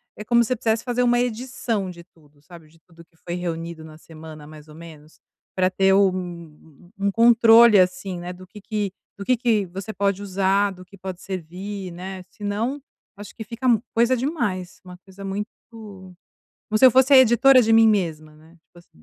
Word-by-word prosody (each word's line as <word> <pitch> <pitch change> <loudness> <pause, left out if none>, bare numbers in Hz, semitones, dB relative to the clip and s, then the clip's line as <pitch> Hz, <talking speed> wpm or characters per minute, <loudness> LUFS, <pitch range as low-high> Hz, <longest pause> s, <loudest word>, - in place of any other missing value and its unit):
é 210 - -8
como 235 +1 +3
se 235 - -6
eu - - -5
quisesse 225 0 -1
fazer 250 0 -1
uma 240 0 +2
edição 235 -4 -3
de 170 -1 -13
tudo, 150 -4 -27
sabe, 170 0 -15
de 165 +1 -25
tudo 170 0 -19
que 165 - -37
foi 175 +1 -7
reunido 170 -2 -5
na 155 0 -13
semana 155 -2 -12
mais 155 0 -14
ou 155 - -15
menos, 155 -1 -14 0.4
pra 185 -1 +2
ter 190 +1 +2
um 175 -5 -3
um 200 0 -1
controle, 230 -1 +6
assim, 185 0 -1
né, 175 +1 -7
do 185 +1 -14
que 210 - -13
que 205 -1 -4 0.2
do 200 - -8
que 255 - +2
que 225 -4 +1
você 195 +5 -8
pode 200 0 -1
usar, 195 +1 0
do 185 -1 -12
que 200 +2 -17
pode 185 -1 -8
servir, 190 +2 -7
né. 185 +2 -8
Se 210 - -14
não 225 +8 -3 0.3
acho 205 0 -12
que 220 - -7
fica 230 +4 -5 0.3
coisa 240 +3 +2
demais, 235 - -3
uma 180 -1 -12
coisa 195 +1 -13
muito 200 +2 -4 1.2
como 215 - 0
se 260 - +4
eu - - +7
fosse 260 +3 +3
a 270 - +9
editora 260 +2 +6
de 225 0 +1
mim 225 0 +6
mesma, 160 -7 -2
né, 160 +2 -20
tipo 170 +1 -23
assim. 125 - -23
195 Hz, 200 wpm, -22 LUFS, 170-225 Hz, 1.2 s, a